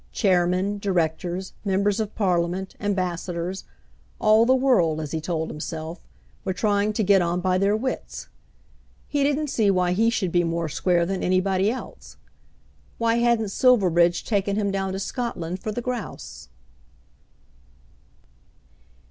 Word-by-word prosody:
Chairmen, 185 0 +1
directors, 180 -1 -1
members 200 +1 +1
of 215 -1 -3
Parliament, 185 -1 0
ambassadors, 180 -2 -3 0.5
all 220 +2 +5
the 260 - +5
world, 225 -13 +2
as 150 -2 -5
he 160 - -2
told 160 -1 -2
himself, 160 +2 -6 0.4
were 190 - -1
trying 205 0 +1
to 215 - 0
get 195 -1 +4
on 175 +1 0
by 185 0 +1
their 200 +2 +2
wits. 260 +3 -5 0.8
He 290 - -1
didn't 290 0 0
see 215 -3 +2
why 180 -2 +2
he 220 +5 +3
should 195 -7 -1
be 175 0 +3
more 165 -1 -2
square 175 +3 +1
than 190 +1 -3
anybody 185 +2 +2
else. 255 +3 -7 0.8
Why 230 0 +1
hadn't 235 -3 +2
Silverbridge 180 -8 +3
taken 200 -2 0
him 205 -1 0
down 195 -1 -2
to 190 - -3
Scotland 190 -6 -4
for 215 - -3
the 240 - -4
grouse? 215 - -6
190 Hz, 140 wpm, -24 LUFS, 175-215 Hz, 0.8 s, all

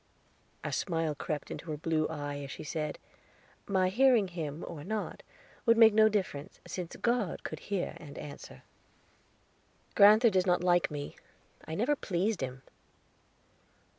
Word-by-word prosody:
A - - -3
smile 165 -4 -1
crept 150 0 -4
into 165 - -7
her 150 - -3
blue 155 0 0
eye, 145 -2 -4
as 140 -1 -7
she - - -7
said: 150 -1 -3 0.7
"My 185 -2 +2
hearing 235 -2 +4
him, 160 -3 -5
or 155 -4 -7
not, 215 +4 -4 0.5
would 230 0 +6
make 225 -2 +8
no 220 0 +6
difference, 185 -9 -3
since 180 -2 -6
God 235 -7 -1
could 155 - -5
hear 200 -3 -1
and 145 -3 -11
answer." 145 -1 -9 1.3
"Grand'ther 215 +3 +7
does 190 -1 +2
not 180 0 +2
like 175 -1 +3
me; 145 -2 -6 0.5
I 160 - -5
never 245 - +2
pleased 195 - -1
him." 130 0 -5
175 Hz, 145 wpm, -31 LUFS, 150-210 Hz, 1.3 s, make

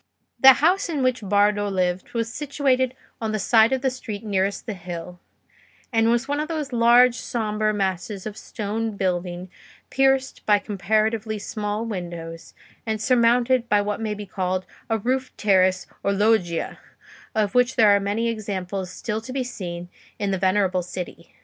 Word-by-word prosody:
The 265 0 +10
house 350 +7 +2
in 295 -5 -1
which 255 -2 +1
Bardo 205 +1 +2
lived 185 -1 -1
was 230 0 -1
situated 265 -3 0 0.3
on 220 -1 -2
the - - +1
side 220 +3 +4
of 265 0 0
the 265 - +2
street 220 -5 -7
nearest 200 -2 -1
the 220 - -3
hill, 180 -1 -8 0.7
and 225 0 +3
was 240 +2 +1
one 290 +1 -1
of 305 - -2
those 305 -5 -4
large 240 +1 +6
sombre 215 -2 -1
masses 195 0 -2
of 215 -1 -5
stone 215 0 -4
building 180 -1 -2 0.4
pierced 270 0 +1
by 210 -1 +6
comparatively 215 +2 -1
small 210 +1 -3
windows, 170 -5 -7 0.3
and 220 -1 -2
surmounted 240 +1 +3
by 210 - +4
what 205 +2 -2
may 215 -1 -2
be 205 0 -7
called 185 -1 -2 0.2
a 225 - +2
roofed 255 +4 -2
terrace 190 -2 +3 0.2
or 200 - +1
loggia, 200 -5 +1 0.6
of 210 -1 +1
which 250 0 +3
there 215 -5 +6
are - - +3
many 205 +4 -1
examples 195 -4 -3
still 215 +4 -4
to 230 - -8
be 260 0 -1
seen 175 -8 -6 0.3
in 200 -1 -1
the 190 - -1
venerable 185 -1 +2
city. 175 -1 -8
215 Hz, 165 wpm, -23 LUFS, 190-240 Hz, 0.7 s, The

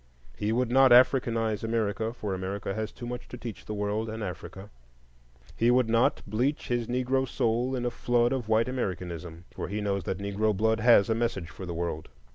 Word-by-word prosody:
He 105 +7 -1
would 120 +1 0
not 135 +1 +6
Africanize 115 -4 +4
America, 110 -1 -1
for 105 -4 -4
America 95 +1 -3
has 110 0 -3
too 120 - -9
much 125 0 -6
to 125 - -8
teach 115 -4 -7
the 105 - -5
world 105 +2 -2
and 110 0 -5
Africa. 95 +1 -7 0.8
He 115 - +2
would 125 -1 +3
not 115 +1 +2
bleach 125 +8 -1
his 120 -2 0
Negro 130 +2 0
soul 120 +1 0
in 125 -1 -2
a 120 - 0
flood 120 +1 +1
of 120 -5 -3
white 110 +2 +3
Americanism, 90 -8 -4
for - - -5
he 100 +3 -3
knows 100 -2 -1
that 95 - -2
Negro 100 +1 -1
blood 110 +2 +2
has 115 -3 +6
a 110 - +2
message 110 -7 -2
for 95 - -8
the 85 - -4
world. 85 -2 -3
110 Hz, 200 wpm, -28 LUFS, 100-120 Hz, 0.8 s, not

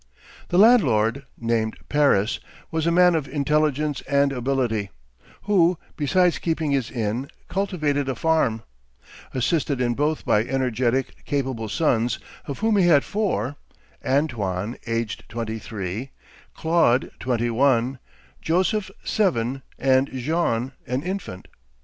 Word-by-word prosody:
The 175 - 0
landlord, 140 - +4
named 115 -1 -1
Paris, 140 -8 +2 0.3
was 160 0 0
a - - +3
man 180 +1 +5
of 155 -4 -1
intelligence 150 0 0
and 140 -1 +3
ability, 125 -5 -1 0.5
who, 180 -4 +3 0.2
besides 175 +4 +2
keeping 160 -3 -1
his 135 -5 0
inn, 120 +3 -2 0.2
cultivated 155 -8 -1
a 130 - -1
farm; 115 -7 +1 0.7
assisted 140 +1 0
in 120 -1 +1
both 150 +5 -1
by 105 - +3
energetic, 130 0 -1
capable 130 -6 -2
sons, 120 -2 +1 0.3
of 140 - -5
whom 220 -2 +3
he 185 -3 +4
had 145 -5 +5
four: 195 - -1 0.5
Antoine, 115 -7 -1
aged 115 -1 -2
twenty 115 0 -4
three; 105 +4 -5 0.5
Claude, 160 -6 +2
twenty 120 -2 0
one; 130 0 +2 0.4
Joseph, 190 +4 +1
seven; 135 - 0 0.2
and 130 0 +3
Jean, 130 -2 -1 0.2
an 125 +3 -2
infant. 180 - -5
135 Hz, 120 wpm, -23 LUFS, 115-160 Hz, 0.7 s, man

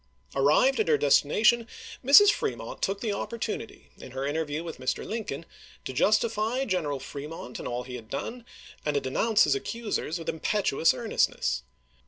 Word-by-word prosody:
Arrived 150 - +4
at 440 - +2
her 455 - +4
destination, 230 - +3 0.4
Mrs. 285 +11 +8
Fremont 115 - -4
took 195 +1 -1
the 220 -3 -1
opportunity, 225 +1 -5
in 130 - -11
her 135 +1 -3
interview 150 +1 -2
with 165 -5 -7
Mr. 130 0 -2
Lincoln, 210 -9 -4 0.4
to 130 - -4
justify 220 - +1
General 160 - -1
Fremont 140 -1 -7
in - - -5
all 120 0 -3
he 125 0 -7
had 110 -2 -13
done, 230 - -5 0.4
and 150 -1 -1
to - - +3
denounce 210 - +2
his - - +3
accusers 230 - -3
with 165 - -9
impetuous 165 -2 +1
earnestness. 220 - 0
170 Hz, 160 wpm, -27 LUFS, 140-230 Hz, 0.4 s, Mrs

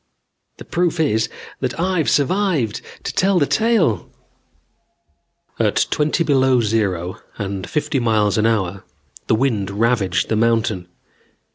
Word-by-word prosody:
The - - -11
proof 175 -1 0
is 110 -8 +1 0.3
that - - -3
I've 180 -3 +1
survived 155 - +1 0.2
to - - -4
tell 195 0 +2
the 150 - +3
tale." 200 - +1 1.5
At - - +2
twenty 155 +3 +1
below 130 -4 +3
zero 100 -6 -1 0.2
and 100 -2 -4
fifty 150 -2 -1
miles 110 -4 +2
an 110 - +3
hour 100 -4 -1 0.4
the - - +3
wind 110 -6 0
ravaged 100 -4 +1
the 110 - +1
mountain. 110 -5 +1
115 Hz, 125 wpm, -20 LUFS, 100-155 Hz, 1.5 s, the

